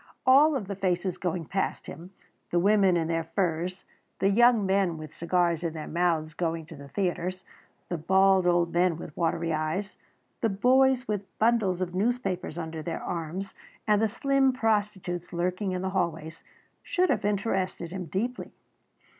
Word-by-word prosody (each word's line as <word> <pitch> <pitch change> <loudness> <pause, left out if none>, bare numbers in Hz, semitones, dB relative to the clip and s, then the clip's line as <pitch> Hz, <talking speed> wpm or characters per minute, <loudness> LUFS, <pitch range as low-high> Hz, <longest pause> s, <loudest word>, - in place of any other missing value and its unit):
All 280 +4 +6
of 215 -8 -3
the 200 - -3
faces 185 -1 -1
going 175 -2 -2
past 195 +5 -2
him, 170 +2 -9 0.4
the 175 - 0
women 195 -1 +4
in 165 -1 0
their 165 0 0
furs, 180 0 -1 0.3
the 195 - +2
young 235 0 +5
men 190 -3 +1
with 155 -1 -9
cigars 170 -1 0
in 165 -2 -2
their 155 -1 -6
mouths 165 -2 0
going 165 -1 -2
to 165 +1 -11
the 140 -1 -11
theatres, 185 +3 -2 0.4
the 175 - -3
bald 190 +2 +4
old 175 -1 +2
men 175 -1 +2
with 165 -2 -9
watery 165 -1 0
eyes, 155 +6 -2 0.4
the 225 - +2
boys 255 +5 +3
with 205 -2 -2
bundles 215 -5 +2
of 180 -1 -2
newspapers 195 -5 -1
under 160 -1 -5
their 165 +2 -4
arms, 175 +3 -4 0.3
and 210 -1 +4
the 225 - +3
slim 270 +4 +2
prostitutes 205 -7 -1
lurking 180 +3 -1
in 185 0 -3
the 190 - -2
hallways, 165 -4 -3 0.4
should 365 -1 +1
have - - 0
interested 190 -4 -1
him 185 -1 -5
deeply. 235 - -3
185 Hz, 165 wpm, -27 LUFS, 170-205 Hz, 0.4 s, All